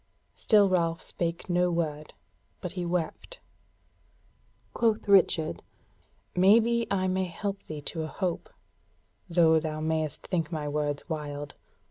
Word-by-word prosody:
Still 210 -3 +4
Ralph 170 -3 +1
spake 170 -1 -4
no 180 0 +2
word; 155 -3 -2 0.5
but 180 - -5
he 180 -1 -4
wept. 180 - -3 1.3
Quoth 225 -2 +1
Richard: 185 -5 +4 0.7
"Maybe 230 +5 +4
I 185 -1 +1
may 185 0 0
help 195 +3 -4
thee 155 -1 -6
to 160 +3 -4
a 155 - -3
hope, 180 +1 -3 0.8
though 165 -2 +5
thou 155 -1 -4
mayest 155 -2 -2
think 165 -5 -2
my 155 -3 -3
words 145 -1 -2
wild. 145 -3 -5
170 Hz, 125 wpm, -28 LUFS, 155-190 Hz, 1.3 s, though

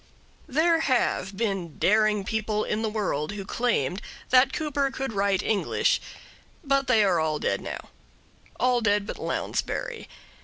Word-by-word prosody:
There 325 +4 +3
have 245 -8 0
been 195 -8 -2
daring 215 0 +3
people 215 0 -1
in 210 - -2
the 220 - 0
world 205 -6 -2
who 200 -2 -6
claimed 200 - 0 0.3
that 260 +1 +6
Cooper 290 -2 -1
could 270 -3 -4
write 200 -1 +1
English, 210 -3 +1 0.6
but 275 -2 +1
they 225 -4 +5
are 185 -4 +3
all 155 -1 0
dead - - -1
now - - -7 0.7
all 250 -1 +3
dead 205 -2 +2
but - - -6
Lounsbury. - - -3
215 Hz, 145 wpm, -26 LUFS, 195-260 Hz, 0.7 s, that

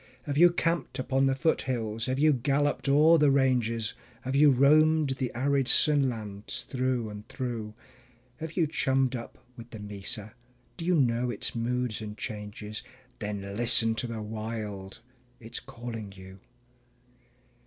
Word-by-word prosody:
Have 140 0 -3
you 175 +4 +7
camped 170 0 -1
upon 135 +1 +1
the 135 - +2
foothills, 120 -6 -1
have 130 0 -1
you 155 +2 +4
galloped 140 +2 0
o'er 155 +4 +6
the 150 -1 +5
ranges, 120 -5 +1 0.3
Have 130 +1 -2
you 150 +1 +7
roamed 150 +2 +4
the 130 -2 -2
arid 135 +1 +1
sun 145 -2 +4
lands 105 -3 -5
through 130 -3 -1
and 105 0 -9
through? 120 -5 -5 0.6
Have 160 +2 -7
you 170 - +4
chummed 135 -3 +1
up 115 - -7 0.2
with 115 -1 -11
the 115 - -8
mesa? 105 +1 -5 0.4
Do 165 - -6
you 180 0 +3
know 125 -4 +2
its 115 - -3
moods 120 -1 -2
and 105 0 -7
changes? 105 0 -6 0.4
Then 105 -2 -4
listen 115 0 +4
to 120 +2 -3
the 115 -2 -5
Wild 110 -2 -6 0.4
it's 115 +1 -7
calling 115 -4 -7
you. 95 0 -12
125 Hz, 150 wpm, -28 LUFS, 110-140 Hz, 0.6 s, you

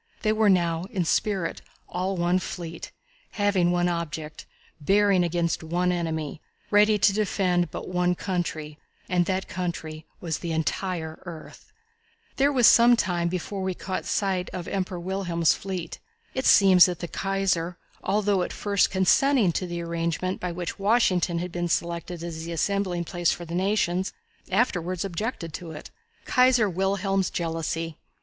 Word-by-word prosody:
They 215 -1 +3
were 215 -1 +3
now, 170 -2 +2
in 190 -7 -1
spirit, 190 0 0 0.3
all 185 +2 -2
one 175 +1 +2
fleet, 170 -2 -7 0.4
having 200 -4 +2
one 175 0 +2
object, 160 -3 -4 0.3
bearing 195 +3 +3
against 170 -1 0
one 175 +3 0
enemy, 160 -3 -3 0.3
ready 210 +1 +5
to 200 0 +4
defend 185 -4 +1
but - - -7
one 180 0 +1
country, 165 -5 -3 0.3
and 175 -1 +1
that 190 0 -1
country 160 -3 -5
was 165 -3 -3
the 170 -2 -3
entire 160 0 -2
earth. 165 -3 -10 0.7
It 280 +1 +5
was 255 -5 +3
some 240 +2 +7
time 175 -6 0
before 185 +2 -4
we 190 -1 -2
caught 185 +1 -4
sight 190 -3 -1
of 180 -2 -6
the - - -6
Emperor 185 -2 -2
William's 175 -2 +1
fleet. 190 -3 -5 0.3
It 260 - -1
seems 190 -3 +7
that 180 -1 -3
the 175 - -5
Kaiser, 185 -3 -1 0.3
although 200 -1 +1
at - - -2
first 200 -2 +1
consenting 210 +3 +3
to 180 +2 -2
the 170 0 -4
arrangement 170 +2 -2
by 180 - -3
which 175 +2 -5
Washington 195 -5 +2
had 175 +1 -3
been 175 0 -2
selected 170 0 -2
as 165 -2 -5
the 170 - -6
assembling 185 0 0
place 175 -1 0
for 175 - -4
the 165 - -8
nations, 190 -1 0 0.4
afterwards 185 -4 0
objected 190 -3 -4
to 170 0 -7
it. 155 -1 -9 0.3
Kaiser 250 -3 +4
Wilhelm's 195 +1 0
Jealousy. 165 -1 -3
180 Hz, 155 wpm, -26 LUFS, 170-195 Hz, 0.7 s, some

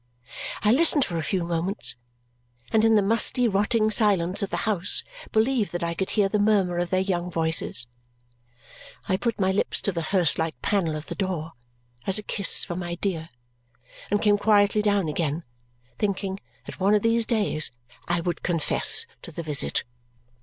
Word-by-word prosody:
I 210 - +4
listened 290 +1 +4
for 170 - -4
a - - -1
few 180 +4 -1
moments, 170 - -1 0.8
and 220 -1 +3
in 225 0 +4
the 210 - +4
musty 230 +4 +2
rotting 215 +2 +1
silence 200 -3 +2
of 200 - -2
the - - -3
house 205 -3 +1 0.3
believed 220 0 +1
that 175 0 -3
I 170 0 -1
could 190 +3 -3
hear 205 -2 +2
the 210 +2 -1
murmur 200 -4 +2
of 175 0 -2
their 185 0 +1
young 180 -2 -2
voices. 160 -7 +1 1.2
I 190 - +1
put 230 +3 -2
my 190 -1 +2
lips 195 - 0
to 200 - +1
the 170 -2 -3
hearse 170 -1 +2
like 160 0 -2
panel 175 -7 0
of 155 0 -6
the - - -6
door 170 -4 -4 0.5
as 195 - +5
a 210 - -4
kiss 200 -1 +3
for 175 - -5
my 175 -1 -4
dear 170 -3 -3 0.8
and 205 - +1
came 205 -1 +3
quietly 205 0 +3
down 205 -4 +1
again, 155 +1 -2 0.6
thinking 195 -1 -2 0.3
that - - -10
one 200 +2 +3
of 210 - +1
these 230 0 +2
days 205 -9 +1 0.4
I 175 0 0
would 175 -1 -3
confess 165 -4 +2 0.2
to - - -10
the 165 +2 -6
visit. 150 -2 -1
190 Hz, 180 wpm, -25 LUFS, 170-210 Hz, 1.2 s, as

